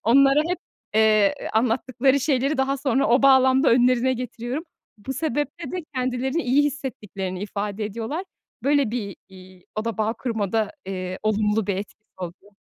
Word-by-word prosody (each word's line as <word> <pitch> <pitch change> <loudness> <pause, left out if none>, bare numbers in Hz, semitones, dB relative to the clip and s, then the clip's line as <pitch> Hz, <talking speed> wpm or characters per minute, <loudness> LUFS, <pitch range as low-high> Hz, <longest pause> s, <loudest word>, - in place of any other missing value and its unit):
onlara 275 +4 +5
hep, 360 - -1 0.4
eee, 215 -2 +4
ııı, - - -4
anlattıkları 255 +4 +2
şeyleri 275 +1 +1
daha 265 +1 +1
sonra 270 0 +1
o 245 +3 +3
bağlamda 265 +1 +5
önlerine 250 +1 +4
getiriyorum. 250 +4 -4 0.3
Bu 265 +6 -5
sebeple 295 +3 -2
de 360 -3 -4
kendilerini 255 +5 -1
iyi 265 +4 +3
hissettiklerini 210 -10 -4
ifade 205 0 -3
ediyorlar. 230 - -4 0.4
Böyle 280 -3 +2
bir, 210 -6 -4
iii, 185 -1 -15
o 215 +1 -2
da 230 -2 -3
bağ 215 +1 +1
kurmada, 220 -1 -1
eee, 185 -1 -4
olumlu 215 -1 +1
bir 200 - 0
etkisi 210 +2 -8
oluyor. 185 +3 -9
240 Hz, 150 wpm, -24 LUFS, 210-270 Hz, 0.4 s, onlara